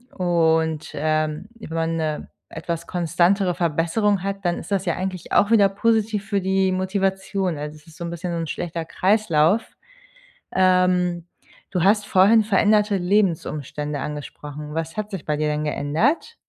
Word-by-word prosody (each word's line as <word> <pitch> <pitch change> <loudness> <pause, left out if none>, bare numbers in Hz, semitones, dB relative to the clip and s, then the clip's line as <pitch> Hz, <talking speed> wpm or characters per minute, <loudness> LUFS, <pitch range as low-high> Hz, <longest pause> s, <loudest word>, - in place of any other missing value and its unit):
Und, 160 -3 +1
ähm, 155 +3 -1
wenn 165 -6 -7
man 165 0 0
'ne 155 -2 -3 0.2
etwas 170 -1 -5
konstantere 180 +2 +1
Verbesserung 175 +5 0
hat, 195 0 -4
dann 175 -1 0
ist - - -10
das 195 -1 0
ja 170 - 0
eigentlich 185 -1 -5
auch 205 +2 +3
wieder 205 -3 +6
positiv 215 0 0
für 200 -3 0
die 190 0 +1
Motivation. 190 -2 -1
Also, 150 +1 -6
es 155 +2 -18
ist 160 - -16
so 170 - -6
'n 170 - -4
bisschen 170 +1 -5
so 170 - -2
'n 165 - -3
schlechter 165 0 -4
Kreislauf. 190 0 +2 0.9
Ähm, 180 -2 +2 0.5
du 180 -3 0
hast 205 +2 +3
vorhin 205 +4 +5
veränderte 210 0 +3
Lebensumstände 155 -6 -1
angesprochen. 150 +1 -7
Was 165 +2 -4
hat 215 0 -3
sich 190 -5 -6
bei 150 - 0
dir 155 - 0
denn 150 0 -1
geändert? 160 - 0
180 Hz, 160 wpm, -22 LUFS, 160-195 Hz, 0.9 s, wieder